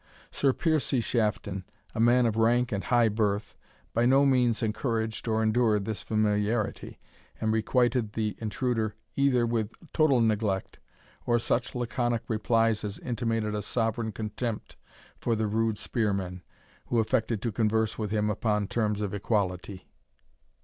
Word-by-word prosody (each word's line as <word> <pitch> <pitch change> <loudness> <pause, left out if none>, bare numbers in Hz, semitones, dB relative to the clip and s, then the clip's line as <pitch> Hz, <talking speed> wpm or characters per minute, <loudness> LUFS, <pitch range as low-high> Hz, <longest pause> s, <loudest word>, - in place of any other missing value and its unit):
Sir 140 - +2
Piercie 155 -3 +1
Shafton, 105 -4 -1 0.3
a 110 - -5
man 120 +2 +5
of 110 -2 +1
rank 120 +2 +2
and 100 -2 -2
high 120 -2 +4
birth, 105 -1 -1 0.4
by 120 +1 +3
no 135 +2 +5
means 125 -4 +2
encouraged 110 0 -2
or 110 0 +1
endured 110 -2 +2
this 110 -1 -3
familiarity, 105 0 -1 0.4
and 110 0 +1
requited 120 0 +1
the 110 -2 -1
intruder 110 0 -1 0.2
either 135 -4 +3
with 115 -2 -1 0.2
total 155 -6 +4
neglect, 105 -4 0 0.5
or 120 - +4
such 120 +1 -1
laconic 120 -1 -1
replies 115 0 +1
as 105 -1 -4
intimated 115 -3 -2
a 105 - -2
sovereign 115 0 -1
contempt 110 +2 -4 0.4
for 115 - 0
the 110 0 0
rude 110 0 0
spearman, 100 -5 -2 0.5
who 120 - 0
affected 115 -1 +1
to 115 - 0
converse 110 +1 0
with 105 -2 -2
him 105 0 0
upon 105 0 0
terms 105 -2 -1
of 100 -2 -2
equality. 100 -2 -2
110 Hz, 145 wpm, -28 LUFS, 105-120 Hz, 0.5 s, man